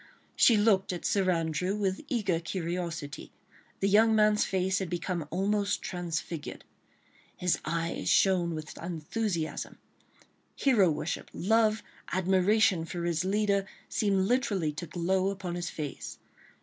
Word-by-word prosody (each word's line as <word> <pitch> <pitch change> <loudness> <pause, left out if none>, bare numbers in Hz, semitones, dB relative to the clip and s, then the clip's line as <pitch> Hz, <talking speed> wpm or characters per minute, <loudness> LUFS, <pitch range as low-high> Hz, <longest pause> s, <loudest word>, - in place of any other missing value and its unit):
She 230 - +6
looked 205 -2 +3
at 175 - -5
Sir 195 -2 +2
Andrew 170 +2 0
with 195 -2 -1
eager 205 - 0
curiosity. 170 -4 -4 0.5
The 195 - +3
young 220 +3 +5
man's 210 -1 +4
face 190 0 0
had 190 -3 -3
become 175 -2 -3
almost 200 +3 0
transfigured. 170 -3 -4 0.7
His 180 -1 +1
eyes 165 0 -2
shone 175 -4 +3
with 155 0 -7
enthusiasm; 170 +1 -3 0.8
hero 225 -10 +4
worship, 155 +1 -3
love, 220 +2 +2 0.3
admiration 190 0 +3
for 170 +1 -5
his 170 -1 0
leader 200 0 +1 0.2
seemed 195 -3 +1
literally 205 - +1
to 170 +3 -6
glow 185 +4 0
upon 190 -3 -4
his 175 -1 -3
face. 150 -3 -6
185 Hz, 125 wpm, -29 LUFS, 170-205 Hz, 0.8 s, She